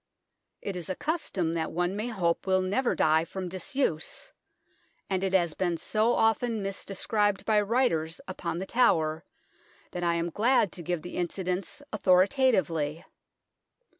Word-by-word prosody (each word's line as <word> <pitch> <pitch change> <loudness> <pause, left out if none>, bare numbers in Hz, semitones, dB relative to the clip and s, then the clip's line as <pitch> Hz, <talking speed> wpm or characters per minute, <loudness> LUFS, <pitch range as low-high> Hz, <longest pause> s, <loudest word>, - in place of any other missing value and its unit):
It 200 - -3
is 180 0 -6
a 185 - -1
custom 290 - -2
that 160 -1 -2
one 175 +3 -1
may 215 +3 -2
hope 185 -7 -1
will 185 0 +3
never 235 +7 +1
die 160 +1 +3
from 185 +1 -5
disuse, 190 - -2 0.8
and 190 0 0
it 190 -1 -1
has 170 -4 +3
been 175 -1 -1
so 220 +7 +1
often 225 0 +1
misdescribed 195 +1 -1
by 215 -1 +4
writers 200 -8 0
upon 175 -3 -4
The 190 - -3
Tower 160 -10 +2 0.7
that 175 - -4
I 170 -1 +2
am 170 0 -1
glad 220 +1 +3
to 180 - -7
give 175 -1 -3
the 175 - -7
incidents 185 - -3
authoritatively. 185 - +2
185 Hz, 145 wpm, -28 LUFS, 170-215 Hz, 0.8 s, by